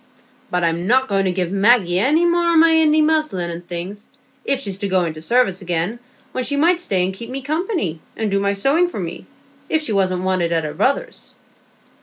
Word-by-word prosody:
But 180 0 -1
I'm 170 +2 0
not 260 +3 +3
going 195 -1 0
to 185 - +1
give 180 -1 -2
Maggie 195 -3 +3
any 300 - +3
more 345 0 +2
o' - - +4
my 330 +1 +6
Indy 310 -1 +4
muslin 305 - 0
and 170 +1 -8
things, 180 +4 -6 0.4
if 275 -1 0
she's 195 -7 -4
to 200 - -2
go 185 -2 +2
into 155 -2 -5
service 200 -1 +1
again, 175 +5 -2 0.3
when 255 - -3
she 285 - +1
might 340 +4 +3
stay 190 - 0
and 190 - -3
keep 230 +5 -9
me 265 +1 -5
company, 310 - -2 0.2
and 220 -2 -2
do 200 - +2
my 200 0 +1
sewing 275 - +2
for 350 - -6
me, 170 -2 -6 0.4
if 315 0 +1
she 225 - -1
wasn't 185 -2 0
wanted 185 -3 0
at 165 -1 +1
her 150 -1 -4
brother's." 265 - -2
200 Hz, 215 wpm, -20 LUFS, 180-285 Hz, 0.4 s, my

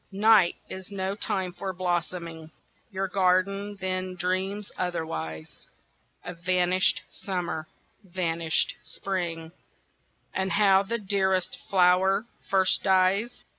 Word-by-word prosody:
Night 205 -2 +5
is 190 -1 -8
no 190 -1 -2
time 190 -3 -2
for 190 +2 -4
blossoming, 175 -2 -3 0.4
Your 195 -2 -2
garden 195 +2 +1
then 185 0 -2
dreams 190 +3 -2
otherwise, 80 - -4 0.6
Of 180 -1 -7
vanished 180 +1 +2
Summer, 175 -5 -4 0.4
vanished 170 -3 0
Spring, 170 -4 -4 0.8
And 190 0 -1
how 195 -2 +5
the 230 +4 -2
dearest 190 -3 0
flower 190 +2 +4 0.2
first 190 -1 +3
dies. 190 +4 +2
185 Hz, 100 wpm, -27 LUFS, 175-195 Hz, 0.8 s, Night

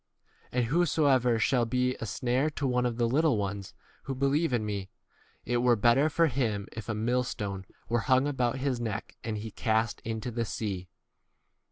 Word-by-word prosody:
43 125 - 0
And 120 - +1
whosoever 140 -8 +3
shall 120 +1 +2
be 125 +2 +1
a 115 - -5
snare 125 +8 0
to 145 -2 -4
one 125 -1 +2
of 115 -1 -3
the 120 -1 +2
little 145 0 +3
ones 100 -1 -4 0.3
who 135 - -3
be 135 +2 0
lieve 150 +3 +2
in 120 -3 0
me, 100 -2 -4 0.6
it 120 +1 +1
were 120 0 +4
better 120 +7 +4
for 165 +2 +3
him 115 -8 -1
if 110 -1 -8
a 110 - -1
millstone 105 -4 -1
v - - -27
were 120 0 +1
hung 130 +2 +3
about 130 -3 0
his 130 -2 -1
neck, 110 -3 -4
and 110 -2 -3
he 110 +1 -6
cast 110 +1 0
into 115 +2 -3
the 115 0 -1
sea. 100 -4 -4
120 Hz, 195 wpm, -29 LUFS, 110-130 Hz, 0.6 s, were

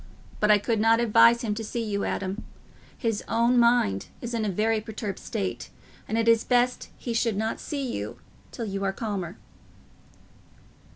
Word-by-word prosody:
But 210 - +2
I 210 - +7
could 220 +2 -1
not 225 +1 +4
advise 235 +1 +5
him 215 -3 0
to 225 +2 -4
see 230 +2 -3
you, 200 -2 -2
Adam. 195 +3 -3 0.5
His 225 -5 -1
own 235 +2 +3
mind 235 - +3
is 240 0 -5
in 230 -2 0
a 210 - 0
very 215 +3 +1
perturbed 215 -2 -5
state, 200 -4 -4 0.4
and 220 - -1
it 230 0 +1
is 230 -1 +5
best 245 0 +1
he 240 - -4
should 225 -2 +1
not 220 +1 -1
see 280 -2 -4
you 240 - -4 0.3
till 235 - -5
you 195 -1 -3
are 195 0 0
calmer." 195 -5 -4
225 Hz, 175 wpm, -26 LUFS, 205-235 Hz, 0.5 s, I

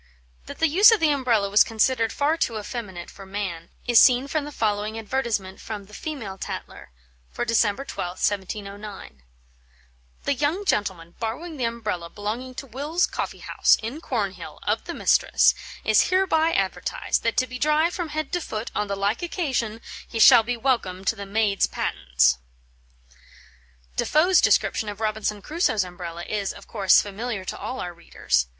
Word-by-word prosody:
That - - -8
the 325 - +3
use 390 +9 +7
of 450 - +4
the 315 -2 +3
Umbrella 245 -7 +2
was 205 +2 +6
considered 225 +1 +1
far 295 +3 +1
too 235 -9 -1
effeminate 205 -5 -6
for 195 - -12
man, 190 -4 -5 0.2
is 240 -2 +6
seen 255 +1 +5
from 300 0 -1
the 295 - -7
following 215 -3 -1
advertisement 220 -4 -2
from 210 -2 -6
the 210 - -18
Female 220 -10 -6
Tatler - - -7 0.4
for - - -3
December 230 +2 +1
12th, 180 -8 -5
1709: 200 - -6 1.0
"The - - +1
young 300 +9 -1
gentleman 185 - -1
borrowing 300 +9 -4
the 250 - -1
Umbrella 215 -7 -3
belonging 225 +7 -5
to 275 - -6
Wills' 290 +8 0
Coffee - - -5
house, - - +4
in 255 +8 -5
Cornhill, 200 - -3
of - - -1
the - - -5
mistress, - - +4 0.3
is - - +4
hereby 360 -4 +3
advertised, - - -1
that 230 - -1
to 255 - +3
be 250 0 -8
dry 305 +4 +3
from 350 -2 -4
head 310 +1 -3
to 355 - -1
foot 215 -6 -5
on 210 - -1
the 200 - -2
like 200 +3 -1
occasion, 260 - -2 0.3
he - - -6
shall 225 - +9
be 240 +2 -3
welcome 220 -7 -1
to 225 - +1
the 200 -2 -7
maid's 205 -1 +2
pattens." 60 -1 +1 1.6
Defoe's 345 +5 +4
description 220 -4 +2
of 205 0 -7
Robinson 215 -2 -2
Crusoe's 300 - +1
Umbrella 175 -1 -7
is, 205 0 -2
of 200 - -13
course, 195 -4 +4
familiar 205 0 -5
to - - -4
all 260 - -5
our 175 -1 -4
readers. 60 - -1
220 Hz, 170 wpm, -24 LUFS, 200-275 Hz, 1.6 s, shall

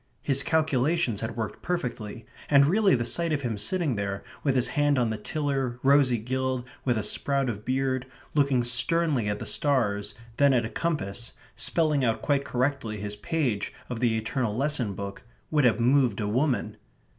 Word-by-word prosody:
His 135 -1 +4
calculations 155 -5 +1
had 115 +1 -4
worked 110 -2 -4
perfectly, 120 -10 -4 0.2
and 140 -1 +6
really 195 +1 +4
the 120 -1 -1
sight 170 +6 0
of 145 -2 -1
him 120 -3 -1
sitting 145 - 0
there, 100 -1 -3 0.2
with 135 -3 +1
his 125 - +3
hand 145 -2 +2
on 120 -3 +1
the 110 - -3
tiller, 135 -1 -2
rosy 135 -3 +4
gilled, 130 +2 -2 0.2
with 125 -3 +1
a 110 - -1
sprout 135 +4 +1
of 105 -1 -8
beard, 130 +1 -1 0.3
looking 140 -4 +2
sternly 125 0 +1
at 105 - -1
the - - -7
stars, 110 -8 0 0.2
then 140 -2 +5
at 120 -2 +2
a - - -4
compass, 120 -8 -3 0.2
spelling 155 -5 +2
out 115 -2 0
quite 140 -1 +1
correctly 130 -4 -1
his 105 +1 -4
page 120 -2 -2 0.2
of 120 - -3
the 115 -2 +2
eternal 110 0 -2
lesson 130 -7 -1
book, 100 0 -6 0.3
would 150 -3 +3
have 115 -2 +3
moved 125 -3 +3
a 105 - -1
woman. 115 -2 0
130 Hz, 180 wpm, -27 LUFS, 110-145 Hz, 0.3 s, and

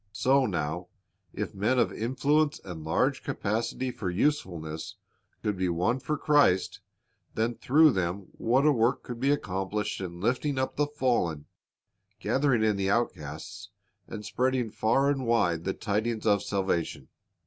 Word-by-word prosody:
So 130 +4 +3
now, 85 -1 -3 0.4
if 105 - -4
men 105 +6 +1
of - - +2
influence 145 +6 +1
and 85 -4 -7
large 125 - +1
capacity 115 +5 -2
for 105 -6 -4
usefulness 85 - -2 0.5
could 105 - 0
be 95 -1 0
won 90 +9 +1
for 150 +3 -2
Christ, 145 -12 +3 0.6
then 115 +2 0
through 150 +6 +5
them 95 -1 -2
what 130 +5 +1
a 150 - +6
work 120 0 +1
could 120 -1 -7
be 135 +3 +1
accomplished 105 -5 -1
in 85 -2 -6
lifting 125 +7 0
up 130 0 -1
the 150 0 +1
fallen, 120 - 0 0.7
gathering 135 -5 +2
in 105 -2 +2
the 95 0 0
outcasts, 100 -1 -3 0.4
and 105 -2 -7
spreading 125 -3 0
far 125 +7 +2
and 135 -4 -2
wide 85 -8 +2
the 95 - 0
tidings 110 +2 -2
of 100 -2 +3
salvation. 95 -5 -2
110 Hz, 150 wpm, -28 LUFS, 95-130 Hz, 0.7 s, a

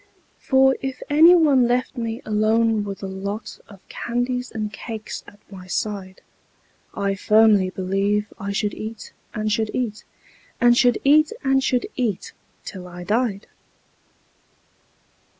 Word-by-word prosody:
For 265 0 +3
if 265 -1 -5
any 325 +4 +7
one 285 -7 +4
left 250 +2 0
me 230 -1 -4
alone 215 +1 +2
with 200 -1 -7
a - - -3
lot 200 +3 -6
Of 195 -2 -17
candies 250 +1 -3
and 215 -2 -5
cakes 220 -1 -7
at 205 - -15
my 185 -2 -11
side, 190 -1 -4 0.7
I 200 0 0
firmly 210 -1 +4
believe 195 +3 -1
I 200 +1 -4
should 205 0 -1
eat, 220 0 -8 0.2
and 215 0 -1
should 220 0 0
eat, 225 -4 -3 0.6
And 240 -1 +5
should 245 -1 +4
eat, 300 +2 +5
and 270 -1 +2
should 250 -2 +1
eat, 230 -7 -2 0.3
till 185 -2 -8
I 175 0 -9
died. 210 0 -1
220 Hz, 135 wpm, -22 LUFS, 200-250 Hz, 0.7 s, any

